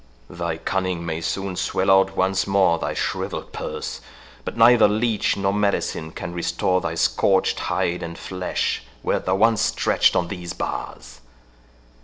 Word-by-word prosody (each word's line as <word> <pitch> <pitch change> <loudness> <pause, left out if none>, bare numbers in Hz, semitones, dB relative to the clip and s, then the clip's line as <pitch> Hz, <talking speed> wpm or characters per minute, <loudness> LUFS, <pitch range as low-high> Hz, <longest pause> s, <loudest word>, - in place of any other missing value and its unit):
Thy 85 -1 -3
cunning 90 0 -2
may 80 -1 -3
soon 95 +2 -3
swell 95 +2 +1
out 95 0 +4
once 95 0 +1
more 95 -4 +3
thy - - -3
shrivelled - - -3
purse, - - -5 0.4
but - - -6
neither 115 0 +7
leech 110 +1 +1
nor 100 0 0
medicine 100 -6 -1
can 85 +1 -6
restore 90 +1 0
thy 85 -1 -3
scorched 95 +3 +2
hide 85 +1 -1
and 85 0 -6
flesh 90 -1 -2 0.2
wert - - -1
thou 95 - +3
once 110 +2 +3
stretched - - +2
on 90 - +1
these 90 -2 -6
bars. - - -6
95 Hz, 150 wpm, -23 LUFS, 85-100 Hz, 0.4 s, neither